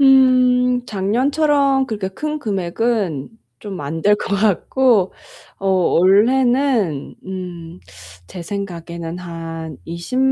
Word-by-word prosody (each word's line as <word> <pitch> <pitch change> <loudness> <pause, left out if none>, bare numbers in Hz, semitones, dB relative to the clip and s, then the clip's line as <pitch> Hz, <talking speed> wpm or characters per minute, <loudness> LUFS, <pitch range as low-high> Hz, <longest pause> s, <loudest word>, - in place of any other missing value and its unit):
음 255 -2 +4
작년처럼 270 +7 +1
그렇게 210 -6 -3
큰 300 +11 -4
금액은 195 - -1 0.3
좀 200 -3 -6
안 155 +3 -4
될 205 0 +5
것 200 -1 -3
같고 215 +1 +2 0.5
어 195 - -5
원래는 205 - +2
음 180 -2 -7 0.5
제 180 - -8
생각에는 170 -3 -6
한 165 -3 -7
20 170 +10 -4
200 Hz, 170 characters per minute, -19 LUFS, 170-250 Hz, 0.5 s, 될